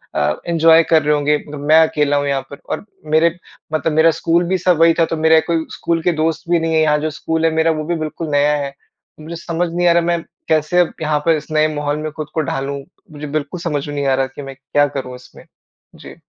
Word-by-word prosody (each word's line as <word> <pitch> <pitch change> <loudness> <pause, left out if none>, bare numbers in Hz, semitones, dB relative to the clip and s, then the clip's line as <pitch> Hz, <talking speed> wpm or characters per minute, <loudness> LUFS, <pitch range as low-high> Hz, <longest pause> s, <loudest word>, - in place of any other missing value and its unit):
अ, 75 +1 +1
enjoy 165 -1 +5
कर 160 -1 +5
रहे 150 - +2
होंगे, 150 +1 +1 0.2
मैं 150 +3 +4
अकेला 145 -2 0
हूँ 145 0 -1
यहाँ 140 -1 0
पर 140 - -10
और - - -4 0.3
मेरे 165 +1 +3 0.4
मतलब 155 0 0
मेरा 160 +1 +5
स्कूल 170 +2 +2
भी 190 +1 +1
सब 180 -3 +2
वही 165 0 +6
था 165 - +5
तो 165 - -4
मेरा 160 0 +5
कोई 165 -1 0
स्कूल 165 -1 -2
के 175 - +2
दोस्त 165 +1 -2
भी 170 -1 +3
नहीं 165 0 -1
है 160 - +4
यहाँ 150 -1 +3
जो 155 +1 -2
स्कूल 160 0 -1
है 165 - +3
मेरा 160 0 +3
वो 155 -1 -3
भी 170 +2 -1
बिल्कुल 155 +1 -6
नया 145 +1 +3
है। 140 - -7 0.5
मुझे 160 +2 -8
समझ 170 +1 -2
नहीं 175 0 +1
आ - - +6
रहा 170 - +3
मैं 170 -1 -1 0.3
कैसे 155 +2 +1
अब 175 - +2
यहाँ 150 -1 0
पर 165 -1 +4
इस 150 +2 -10
नए 155 0 +3
माहौल 145 0 -2
में 155 0 -4
खुद 155 -1 -6
को 160 - 0
ढालूँ। 140 -1 -3 0.3
मुझे 150 0 -7
बिल्कुल 155 +3 -4
समझ 150 -4 -3
में 145 - -5
नहीं 140 -1 -2
आ 135 - +3
रहा 135 0 0
कि 130 - -10
मैं 135 -1 -8
क्या 145 +2 +1
करूँ 130 -2 -6
इसमें? 125 - -16 0.5
जी। - - -12
155 Hz, 250 wpm, -18 LUFS, 145-165 Hz, 0.5 s, वही